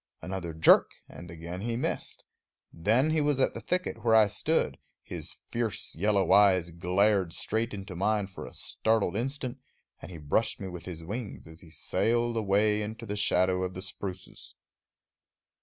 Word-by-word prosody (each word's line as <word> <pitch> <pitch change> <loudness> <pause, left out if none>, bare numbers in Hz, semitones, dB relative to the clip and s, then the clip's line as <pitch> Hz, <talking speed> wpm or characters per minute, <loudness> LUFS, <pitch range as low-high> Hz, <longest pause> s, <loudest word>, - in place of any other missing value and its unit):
Another 90 -2 -5
jerk, 80 - +5
and 85 - -11
again 85 +2 -7
he 115 +2 -2
missed. 120 - -3 0.5
Then 115 - +2
he 155 -1 +2
was 145 -2 +1
at 130 - +2
the - - -6
thicket 180 0 -2
where 115 -2 +4
I 110 -1 +7
stood; 100 -1 0 0.2
his - - -7 0.2
fierce 115 -5 -2
yellow 100 +1 +1
eyes 95 -3 +5
glared 90 +1 +2
straight 115 +2 -2
into 100 -2 -7
mine 105 +3 +1
for 95 -1 -9
a - - -12
startled 110 -5 0
instant, 130 +2 -3 0.4
and - - -9
he 90 - -8
brushed 80 +9 0
me 95 - -5
with 90 -1 -8
his 85 -3 -7
wings 105 +1 -6
as 80 +2 -12
he 85 - -15
sailed 120 +9 0
away 105 0 +2
into 110 +2 -6
the 105 -1 -4
shadow 95 -2 +2
of 90 0 -3
the 95 - -5
spruces. 95 -2 -7
100 Hz, 170 wpm, -29 LUFS, 90-115 Hz, 0.5 s, I